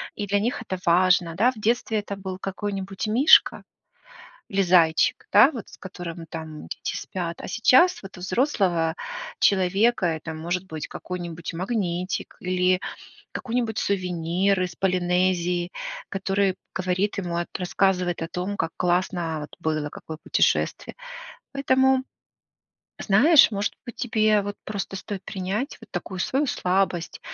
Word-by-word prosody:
и 205 Hz, -, -4 dB
для 200 Hz, +1 st, +2 dB
них 240 Hz, +6 st, -1 dB
это 185 Hz, -, -4 dB
важно, 175 Hz, -1 st, +3 dB
да. 235 Hz, +7 st, +4 dB
В 260 Hz, -, -16 dB
детстве 220 Hz, 0 st, +1 dB
это 205 Hz, -1 st, -5 dB
был 190 Hz, -1 st, -6 dB
какой-нибудь 195 Hz, +1 st, -4 dB
мишка 245 Hz, +8 st, +5 dB, 0.9 s
или 195 Hz, 0 st, +2 dB
зайчик, 170 Hz, -3 st, +3 dB
да, 215 Hz, +8 st, +8 dB
вот 235 Hz, -8 st, -8 dB
с -, -, -14 dB
которым 175 Hz, -3 st, -7 dB
там 160 Hz, -2 st, -7 dB
дети -, -, -4 dB
спят. 170 Hz, -3 st, -5 dB
А -, -, -7 dB
сейчас 260 Hz, +10 st, +4 dB
вот 195 Hz, -1 st, -10 dB
у -, -, -10 dB
взрослого 185 Hz, -, +1 dB, 0.4 s
человека 195 Hz, +3 st, +3 dB
это 160 Hz, 0 st, -3 dB
может 175 Hz, +3 st, -3 dB
быть 160 Hz, -5 st, -6 dB
какой-нибудь 175 Hz, -2 st, -6 dB
магнитик 185 Hz, -1 st, -2 dB
или 185 Hz, 0 st, +1 dB, 0.5 s
какой-нибудь 235 Hz, -3 st, -2 dB
сувенир 185 Hz, 0 st, 0 dB
из 175 Hz, -2 st, -4 dB
Полинезии, 180 Hz, -1 st, +1 dB, 0.4 s
который 195 Hz, 0 st, 0 dB, 0.2 s
говорит 185 Hz, +2 st, 0 dB
ему 175 Hz, -3 st, -3 dB
о 175 Hz, -, 0 dB
т -, -, -52 dB
рассказывает 180 Hz, -1 st, 0 dB
о 165 Hz, -, -3 dB
том, 185 Hz, +4 st, -3 dB
как 165 Hz, -, -1 dB
классно 175 Hz, -2 st, 0 dB
вот 150 Hz, -, -9 dB
было, 155 Hz, -2 st, -1 dB
какое 160 Hz, +1 st, -8 dB
путешествие. -, -, +1 dB, 0.6 s
Поэтому, 265 Hz, -1 st, +3 dB, 0.9 s
знаешь, 275 Hz, +10 st, +6 dB
может 205 Hz, 0 st, -1 dB
быть, 240 Hz, -, -9 dB
тебе 215 Hz, -3 st, +2 dB
вот 205 Hz, +1 st, -5 dB
просто 200 Hz, -2 st, -4 dB
стоит 195 Hz, -1 st, -6 dB
принять 210 Hz, +6 st, -3 dB
вот -, -, -15 dB
такую 180 Hz, +1 st, -5 dB
свою 275 Hz, +9 st, +1 dB
слабость. 185 Hz, -6 st, 0 dB
185 Hz, 140 wpm, -24 LUFS, 175-205 Hz, 0.9 s, да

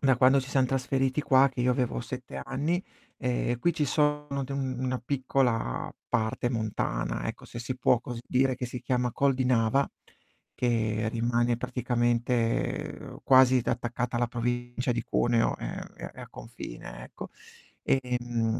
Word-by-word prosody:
da 135 Hz, -2 st, +4 dB
quando 130 Hz, +2 st, +5 dB
ci 130 Hz, -, -8 dB
siam 135 Hz, -2 st, +3 dB
trasferiti 135 Hz, +2 st, 0 dB
qua, 135 Hz, 0 st, +5 dB
che 125 Hz, -, -5 dB
io 125 Hz, +1 st, +3 dB
avevo 125 Hz, -2 st, -1 dB
7 125 Hz, +1 st, -7 dB
anni, 165 Hz, +6 st, -1 dB, 0.4 s
ehm, 120 Hz, -1 st, 0 dB
qui 175 Hz, +8 st, +2 dB
ci 150 Hz, -, +1 dB
sono 150 Hz, -1 st, +1 dB
de 135 Hz, -, -6 dB
una 130 Hz, -1 st, -2 dB
piccola 125 Hz, -, 0 dB, 0.2 s
parte 110 Hz, +2 st, 0 dB
montana, 110 Hz, -, -2 dB
ecco, -, -, -6 dB
se -, -, -8 dB
si 125 Hz, +2 st, -4 dB
può 125 Hz, -1 st, +4 dB
così 120 Hz, -2 st, -6 dB
dire, 130 Hz, 0 st, +2 dB
che 125 Hz, 0 st, -3 dB
si 120 Hz, +1 st, -6 dB
chiama 125 Hz, -1 st, 0 dB
Col 140 Hz, +2 st, +2 dB
di 130 Hz, 0 st, 0 dB
Nava, 125 Hz, +2 st, +3 dB, 0.7 s
che 110 Hz, -3 st, 0 dB
rimane 120 Hz, +1 st, +1 dB
praticamente 120 Hz, -1 st, -1 dB
quasi 130 Hz, -1 st, +6 dB
t -, -, -4 dB
attaccata 120 Hz, +1 st, -1 dB
alla 120 Hz, 0 st, +2 dB
provincia 120 Hz, +1 st, -1 dB
di 120 Hz, -1 st, -2 dB
Cuneo, 115 Hz, 0 st, +2 dB
ehm, -, -, -5 dB, 0.2 s
è -, -, -10 dB
è -, -, -12 dB
a -, -, -9 dB
confine, -, -, -9 dB
ecco. -, -, -9 dB, 0.5 s
Ehm, 120 Hz, -3 st, 0 dB
125 Hz, 160 wpm, -28 LUFS, 120-130 Hz, 0.7 s, quasi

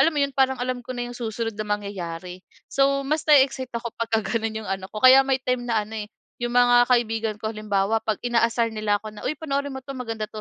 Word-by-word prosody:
alam 330 Hz, -, +5 dB
mo 300 Hz, -, -2 dB
yun, 280 Hz, -, +2 dB
parang 265 Hz, -1 st, +2 dB
alam 250 Hz, 0 st, -2 dB
ko -, -, -10 dB
na 245 Hz, -1 st, -4 dB
yung 245 Hz, -, -8 dB
susunod 225 Hz, -1 st, -3 dB
na 215 Hz, -, -2 dB
mangyayari. 185 Hz, -4 st, -5 dB, 0.3 s
So 275 Hz, 0 st, +2 dB
mas 305 Hz, +2 st, 0 dB
nae-excite 265 Hz, -3 st, +4 dB
ako 235 Hz, -1 st, -5 dB
pagka 225 Hz, -2 st, 0 dB
gano’n 220 Hz, +1 st, -2 dB
yung -, -, -8 dB
ano 190 Hz, 0 st, -3 dB
ko, 215 Hz, -, -6 dB
kaya 260 Hz, +1 st, +10 dB
may 265 Hz, -1 st, +1 dB
time 250 Hz, -1 st, 0 dB
na 220 Hz, -3 st, +1 dB
ano 220 Hz, -, -9 dB
eh, -, -, -16 dB, 0.3 s
yung 240 Hz, 0 st, -1 dB
mga 245 Hz, 0 st, +5 dB
kaibigan 225 Hz, -3 st, +1 dB
ko 220 Hz, +1 st, -3 dB
halimbawa 210 Hz, +1 st, 0 dB
'pag 220 Hz, -2 st, -1 dB
inaasar 230 Hz, -1 st, +1 dB
nila 215 Hz, -1 st, 0 dB
ako 215 Hz, +1 st, -9 dB
na, 210 Hz, -, -10 dB
“Uy, 305 Hz, -, -1 dB
panoorin 280 Hz, -2 st, -2 dB
mo -, -, -6 dB
'to. 275 Hz, -, -6 dB
Maganda.” 225 Hz, -4 st, -4 dB
230 Hz, 235 wpm, -24 LUFS, 215-255 Hz, 0.3 s, kaya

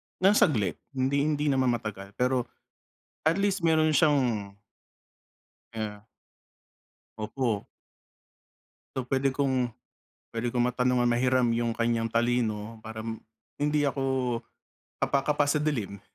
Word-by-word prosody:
nang 190 Hz, +2 st, +4 dB
saglit, 115 Hz, -, +2 dB, 0.2 s
hindi 140 Hz, +3 st, +1 dB
hindi 150 Hz, -1 st, +1 dB
naman 130 Hz, -2 st, +2 dB
matagal, 100 Hz, -3 st, -7 dB
pero 125 Hz, -1 st, +1 dB, 0.8 s
at 165 Hz, -, +4 dB
least 200 Hz, 0 st, +1 dB
meron 160 Hz, -2 st, +3 dB
siyang 125 Hz, -10 st, +2 dB, 1.2 s
Kaya 105 Hz, -1 st, -5 dB, 1.1 s
Opo. 110 Hz, -1 st, -2 dB, 1.3 s
So, 130 Hz, -, 0 dB
pwede 135 Hz, +1 st, +2 dB
kong 130 Hz, -3 st, +1 dB, 0.6 s
pwede 115 Hz, +1 st, -3 dB
kong 125 Hz, -, 0 dB
matanungan, 125 Hz, -1 st, +2 dB
mahiram 125 Hz, 0 st, +3 dB
yung 120 Hz, -1 st, 0 dB
kanyang 115 Hz, 0 st, 0 dB
talino 115 Hz, -2 st, 0 dB
para 110 Hz, 0 st, -6 dB
m 110 Hz, 0 st, -4 dB, 0.4 s
hindi 150 Hz, 0 st, +1 dB
ako 130 Hz, -3 st, 0 dB, 0.6 s
kapa-kapa 145 Hz, +1 st, +1 dB
sa 145 Hz, +1 st, +1 dB
dilim. 115 Hz, -10 st, -2 dB
125 Hz, 110 wpm, -28 LUFS, 115-140 Hz, 1.3 s, nang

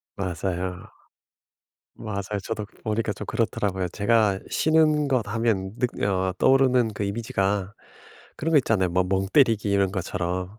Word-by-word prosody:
맞아요. 90 Hz, 0 st, -3 dB, 1.2 s
맞아요. 105 Hz, -2 st, -4 dB
저도 110 Hz, -2 st, -3 dB, 0.2 s
보니까 110 Hz, 0 st, -1 dB
좀 -, -, -7 dB
그렇더라고요. 95 Hz, -5 st, -1 dB
제가 105 Hz, 0 st, +2 dB
쉬는 155 Hz, -2 st, +3 dB
것 125 Hz, -5 st, +1 dB
하면 105 Hz, -3 st, -1 dB
늑 125 Hz, -, -2 dB
어 95 Hz, -2 st, 0 dB
떠오르는 130 Hz, -4 st, +4 dB
그 105 Hz, -, -4 dB
이미지가 100 Hz, -2 st, -1 dB, 0.6 s
그런 165 Hz, +2 st, -2 dB
거 150 Hz, -, +7 dB
있잖아요. 95 Hz, -8 st, +1 dB
뭐 90 Hz, +1 st, +2 dB
멍 95 Hz, +1 st, 0 dB
때리기 115 Hz, -8 st, +3 dB
이런 100 Hz, -1 st, +2 dB
것처럼. 90 Hz, +1 st, -3 dB
105 Hz, 300 characters per minute, -25 LUFS, 95-115 Hz, 1.2 s, 거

